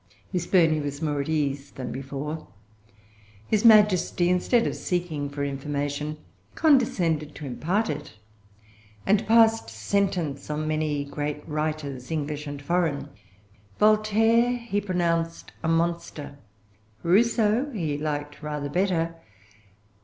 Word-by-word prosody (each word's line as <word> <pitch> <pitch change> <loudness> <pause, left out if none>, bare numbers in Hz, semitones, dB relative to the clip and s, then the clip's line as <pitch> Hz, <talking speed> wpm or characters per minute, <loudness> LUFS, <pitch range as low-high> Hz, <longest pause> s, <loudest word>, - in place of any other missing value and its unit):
Miss 175 -1 -1
Burney 160 -4 +4
was 145 -1 -4
more 150 -3 -1
at 140 - -5
ease 140 -3 -1
than 130 - -6
before. 140 +4 -5 1.0
His 215 -1 +1
Majesty, 210 -5 +5
instead 230 +6 +2
of - - -1
seeking 165 -5 -2
for 140 0 -4
information, 145 +2 -3 0.4
condescended 175 - +2
to 150 - -7
impart 175 - -1
it, 150 -5 -5 0.9
and 205 +1 +2
passed 225 - +5
sentence 155 - -1
on 150 +1 -2
many 155 -2 -1
great 150 +1 -4
writers, 150 -4 -3
English 150 -1 -3
and 145 0 -5
foreign. 160 -3 0 0.7
Voltaire 220 +3 +4
he 235 -4 -2
pronounced 170 -3 -1
a 160 - -2
monster. 165 -3 -1 0.6
Rousseau 225 +6 +3
he 165 - -2
liked 145 0 -4
rather 150 -1 -4
better. 170 0 0
155 Hz, 115 wpm, -26 LUFS, 145-195 Hz, 1.0 s, Majesty